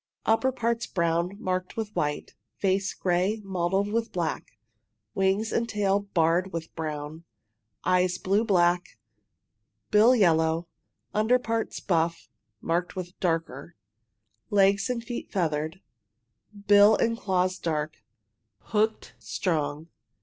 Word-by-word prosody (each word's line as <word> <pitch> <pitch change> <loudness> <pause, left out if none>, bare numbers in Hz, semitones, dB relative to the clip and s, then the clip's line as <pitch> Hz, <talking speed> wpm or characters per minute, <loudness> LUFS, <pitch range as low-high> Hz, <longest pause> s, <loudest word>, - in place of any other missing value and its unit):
Upper 225 +4 +3
parts 235 -2 -1
brown, 170 +2 0
marked 185 -2 -3
with 215 -2 -4
white 150 0 -2 0.2
face 195 0 +1
gray, 185 +4 0
mottled 190 +2 0
with 230 0 -1
black, 165 -9 -3 0.6
wings 195 +3 +1
and 235 0 0
tail 200 -1 +1 0.2
barred 170 +3 +2
with 165 -2 -6
brown, 155 0 -5 0.6
eyes 180 0 +2
blue 200 +4 +1
black, 180 -4 +2 0.9
bill 225 +5 +6
yellow, 165 -4 +2 0.5
under 220 +4 +3
parts 230 -2 -3
buff 165 - -1 0.3
marked 175 +2 -1
with 180 -1 -7
darker, 165 -3 -2 0.7
legs 200 +2 +3
and 240 -2 -2
feet 240 +1 -6
feathered, 160 -1 -1 0.8
bill 205 +1 +7
and 230 +1 +1
claws 185 -3 0
dark, 155 -1 -2 0.6
hooked, 220 +1 -1
strong. 155 -4 -2
185 Hz, 115 wpm, -27 LUFS, 165-210 Hz, 0.9 s, bill